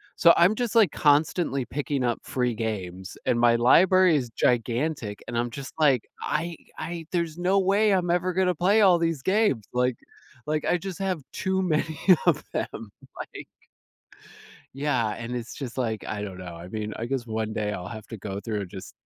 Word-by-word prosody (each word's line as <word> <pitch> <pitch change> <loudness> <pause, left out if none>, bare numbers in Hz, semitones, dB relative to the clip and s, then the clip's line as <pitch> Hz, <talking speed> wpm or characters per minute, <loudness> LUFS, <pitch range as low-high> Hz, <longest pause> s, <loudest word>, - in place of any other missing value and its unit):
So 170 - +7
I'm 175 +5 +5
just, 240 -1 -2
like, 215 -8 +5
constantly 145 -2 +2
picking 140 -1 -2
up 120 -1 0
free 125 -2 -1
games, 95 -4 -5
and 120 - +2
my 120 -1 +5
library 180 +8 +5
is 125 -4 -3
gigantic, 120 -1 -1
and - - -5
I'm 120 +1 0
just, 135 +3 -8
like, 135 -7 +3
I 170 0 -2 0.2
I, 170 -1 -5
there's 170 -2 -1
no 185 +2 +2
way 200 +3 +3
I'm 180 -2 +1
ever 180 +1 +1
gonna 185 0 +2
play 195 +7 +3
all 185 -4 +6
these 165 -4 0
games, 195 - +2
like 125 0 +1 0.5
like, 155 0 -1
I 180 - +2
just 185 -1 -7
have 190 -4 -1
too 190 -1 0
many 160 -3 0 0.3
of 155 -3 +3
them, 110 -3 -4 0.3
like - - -11 1.3
yeah, 130 -6 0
and 115 +1 -5
it's 120 -1 -5
just, 130 -3 -7
like, 110 -4 -2
I 105 -1 -4
don't 95 -3 -6
know. 90 -2 -8
I 85 +1 -10
mean, 105 +1 -4
I 115 - -4
guess 130 -1 -3
one 110 -1 -3
day 105 -1 -2
I'll 90 -2 -5
have 110 0 -8
to 115 - -7
go 100 0 -5
through 105 0 -3
and 95 - -8
just 95 0 -9
135 Hz, 190 wpm, -26 LUFS, 110-175 Hz, 1.3 s, So